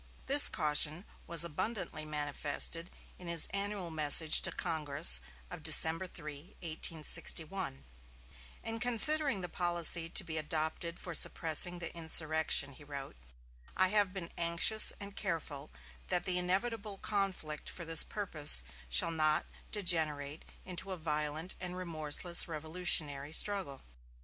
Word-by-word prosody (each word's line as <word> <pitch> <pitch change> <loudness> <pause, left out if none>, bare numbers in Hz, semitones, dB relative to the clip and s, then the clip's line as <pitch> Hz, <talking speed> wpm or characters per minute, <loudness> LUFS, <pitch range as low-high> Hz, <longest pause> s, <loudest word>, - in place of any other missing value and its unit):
This 285 +1 +7
caution 155 +3 +2 0.2
was 170 0 +6
abundantly 170 -1 -6
manifested 150 +2 -1 0.3
in 180 - -14
his 170 -2 +3
annual 200 -3 -6
message 155 0 +3
to - - +1
Congress 150 - +1 0.3
of - - -11
December 165 +3 +4
3, 150 -2 -13
1861: 160 - -4 0.8
"In 225 0 -5
considering 245 0 +7
the 180 - -6
policy 170 -1 +1
to - - +1
be 160 -1 -6
adopted 160 +2 -6
for 175 - -10
suppressing 165 +3 +2
the 170 -1 -7
insurrection," 160 -3 +1
he 145 - -18
wrote, 140 - -11 0.6
"I 185 0 0
have 205 -2 -1
been 185 -3 -10
anxious 170 +6 +3
and 200 0 -10
careful 160 -7 -7 0.4
that 180 -2 -2
the 180 0 -3
inevitable 200 +3 -5
conflict 190 -8 -5
for 170 - -10
this 165 -1 +5
purpose 155 - +2 0.3
shall - - 0
not 155 -1 -2 0.3
degenerate 160 -7 -4 0.2
into 185 +1 -7
a 185 - -8
violent 155 +2 -5
and 180 0 -9
remorseless 170 0 +2
revolutionary 155 -3 -3
struggle. 190 -9 -1
165 Hz, 125 wpm, -29 LUFS, 155-185 Hz, 0.8 s, This